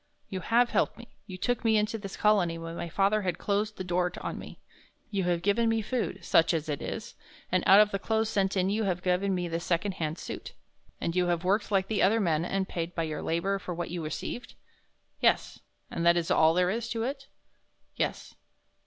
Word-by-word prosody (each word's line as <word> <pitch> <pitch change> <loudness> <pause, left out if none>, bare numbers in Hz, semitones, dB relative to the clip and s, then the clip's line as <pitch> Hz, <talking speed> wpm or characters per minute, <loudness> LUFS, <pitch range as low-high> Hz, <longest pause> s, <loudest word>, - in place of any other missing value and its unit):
"You 190 - -3
have 235 +6 +2
helped - - +1
me; 235 0 -12 0.2
you 185 -3 -7
took 245 +5 -1
me 220 -1 +4
into 210 +1 0
this 195 -2 -7
Colony 195 -6 +3
when 165 0 -6
my 170 0 -4
father 200 +5 +2
had 180 -3 -2
closed 210 +1 -1
the 185 - -4
door 180 0 0
on - - -4
me; - - -10 0.5
you 195 -3 0
have 175 -1 0
given 225 +4 +2
me 225 -1 +1
food 200 -6 -3
such 165 +1 +4
as 155 -1 -2
it 145 -2 -3
is - - -5 0.4
and 185 -1 +2
out 195 +2 +9
of 210 0 +5
the 195 - -1
clothes 220 +2 0
sent 195 -2 0
in 185 +1 +2
you 215 +1 0
have 180 -2 -1
given 185 +1 +1
me 175 -1 -2
this 165 0 -3
second 175 +4 0
hand 155 +1 -1
suit." - - -7 0.5
"And 170 - -2
you 180 -1 +2
have 175 -1 0
worked 200 +3 +1
like 195 -2 +2
the 215 -1 0
other 220 +4 +4
men 165 -6 +1
and 190 +2 -1
paid 170 0 -4
by 165 - 0
your 155 -1 -3
labor 195 +4 0
for 180 -2 -5
what 175 0 -4
you 175 -2 -3
received?" 155 +10 -5 0.6
"Yes." - - +2 0.3
"And 170 - -2
that 170 0 +5
is 170 -1 -1
all 160 +1 +5
there 180 0 +3
is 230 +2 -3
to 225 -1 -2
it?" 270 +2 -4 0.7
"Yes." - - -2
190 Hz, 225 wpm, -29 LUFS, 170-210 Hz, 0.7 s, out